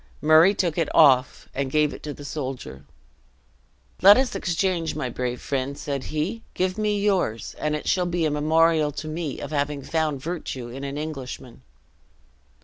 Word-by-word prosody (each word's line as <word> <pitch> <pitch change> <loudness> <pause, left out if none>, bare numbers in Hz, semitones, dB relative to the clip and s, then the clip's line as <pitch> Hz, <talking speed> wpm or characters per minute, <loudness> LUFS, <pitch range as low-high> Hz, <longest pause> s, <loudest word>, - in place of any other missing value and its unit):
Murray 160 +6 +6
took 170 -4 0
it 165 - 0
off, 130 -5 +4
and 135 -1 -2
gave 150 +1 +2
it - - -10
to 150 - -5
the 145 0 -10
soldier. 130 - -6 1.2
"Let 200 +2 +9
us 260 -1 +1
exchange, 175 -3 -1
my 130 -5 -3
brave 125 0 -3
friend!" 140 0 -3
said 140 -3 -4
he; 165 +10 -3
"give 185 0 0
me 210 -1 0
yours, 190 - 0
and 150 0 0
it 150 - -5
shall 180 -1 +2
be 175 -1 0
a 155 - +1
memorial 155 +1 +3
to 155 - -6
me 155 -3 -4
of 145 - -6
having 145 -1 -1
found 155 -3 -1
virtue 135 -5 -5
in 135 +3 -8
an 140 +1 -4
Englishman." 135 -5 -7
150 Hz, 170 wpm, -24 LUFS, 140-170 Hz, 1.2 s, Let